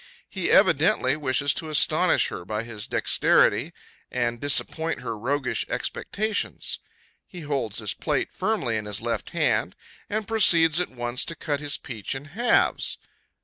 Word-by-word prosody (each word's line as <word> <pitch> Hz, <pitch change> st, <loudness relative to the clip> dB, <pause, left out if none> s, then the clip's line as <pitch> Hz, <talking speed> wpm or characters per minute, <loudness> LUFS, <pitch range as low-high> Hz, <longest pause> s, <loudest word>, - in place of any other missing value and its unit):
He -, -, -3 dB
evidently 130 Hz, +2 st, +4 dB
wishes 140 Hz, -1 st, +1 dB
to 160 Hz, -, -4 dB
astonish 150 Hz, -, +3 dB
her -, -, -7 dB
by 105 Hz, +4 st, -3 dB
his 110 Hz, -3 st, -4 dB
dexterity, -, -, +2 dB, 0.4 s
and 120 Hz, -2 st, -2 dB
disappoint 160 Hz, +3 st, +1 dB
her 115 Hz, -, -4 dB
roguish 130 Hz, +5 st, -1 dB
expectations. 215 Hz, 0 st, -2 dB, 0.5 s
He 180 Hz, -, -10 dB
holds 135 Hz, -8 st, -3 dB
his 105 Hz, -3 st, -1 dB
plate -, -, -2 dB
firmly 115 Hz, -2 st, -1 dB
in 105 Hz, -, -5 dB
his 105 Hz, -1 st, -2 dB
left 120 Hz, 0 st, -3 dB
hand, -, -, 0 dB, 0.3 s
and 215 Hz, 0 st, -2 dB
proceeds, 170 Hz, -7 st, +4 dB
at 180 Hz, -, -3 dB
once, 120 Hz, 0 st, -2 dB
to 165 Hz, -, -3 dB
cut 145 Hz, -2 st, -2 dB
his 145 Hz, 0 st, -2 dB
peach 115 Hz, -1 st, -6 dB
in 135 Hz, +2 st, -7 dB
halves. 225 Hz, +10 st, +1 dB
140 Hz, 145 wpm, -25 LUFS, 115-160 Hz, 0.5 s, evidently